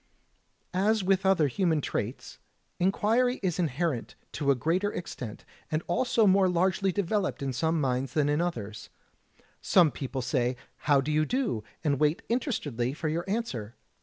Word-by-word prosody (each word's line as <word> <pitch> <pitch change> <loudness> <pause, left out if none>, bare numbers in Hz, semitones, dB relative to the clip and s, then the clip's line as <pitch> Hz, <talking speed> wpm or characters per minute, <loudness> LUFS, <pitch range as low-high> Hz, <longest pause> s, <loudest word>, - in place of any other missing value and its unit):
As 205 +3 +2
with 190 +1 +2
other 180 -6 +4
human 165 +2 +1
traits, - - -4 0.4
inquiry 225 +7 +2
is 180 -2 0
inherent 155 -5 -1 0.2
to 140 - -2
a 140 - +5
greater 175 - 0
extent 125 -10 -7 0.2
and 155 0 -1
also 225 +5 +2
more 190 -1 +5
largely 185 +2 +2
developed 200 -3 -1
in 135 -1 -2
some 160 +5 +1
minds 130 -2 -1
than 150 -2 +2
in 145 +2 +1
others. 110 -12 -4 0.7
Some 170 -5 +5
people 135 -1 -4
say 125 -1 0 0.3
"How 140 -2 +6
do 145 +3 -2
you 155 0 +3
do?" 230 - -1 0.2
and 140 -4 +1
wait 150 +1 +2
interestedly 145 - -1
for 155 0 -2
your 170 +4 -2
answer. 130 - -3
165 Hz, 155 wpm, -28 LUFS, 135-190 Hz, 0.7 s, How